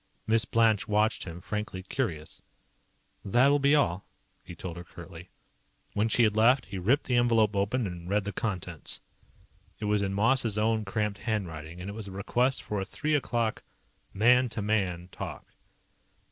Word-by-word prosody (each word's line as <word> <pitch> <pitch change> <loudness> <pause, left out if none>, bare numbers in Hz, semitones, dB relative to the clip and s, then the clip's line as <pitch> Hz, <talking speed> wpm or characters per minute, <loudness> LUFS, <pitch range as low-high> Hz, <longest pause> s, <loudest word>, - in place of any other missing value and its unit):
Miss 115 +1 +3
Blanche 115 -4 +3
watched 105 +1 +1
him, 85 -1 -7
frankly 105 -2 -4
curious. 95 - -3 0.8
"That 120 +7 +4
will 145 +1 +4
be 140 +1 +4
all," 95 - +1 0.4
he 90 - -10
told 85 0 -6
her 85 - -7
curtly. - - -11 0.6
When 105 +2 +1
she 120 - +3
had 105 -2 +3
left, 125 +5 +4
he 95 - -6
ripped 125 - +2
the 125 - +1
envelope 115 -3 +3
open 105 +5 +1
and 90 -2 -6
read 105 +1 +1
the 100 0 -4
contents. 90 -6 -4 0.8
It 105 - -5
was 105 0 +2
in 95 -1 -1
Moss's 115 0 +2
own 110 0 +1
cramped 105 0 -2
handwriting, 85 -7 -4
and 90 - -6
it 100 - -5
was 110 -1 -6
a - - -7
request 120 +7 0
for 105 -2 -2
a - - -1
three 155 +6 -2
o'clock 120 -6 0 0.5
"man 125 +4 +4
to 110 - -3
man" 95 -4 0
talk. - - -7
105 Hz, 175 wpm, -29 LUFS, 95-115 Hz, 0.8 s, That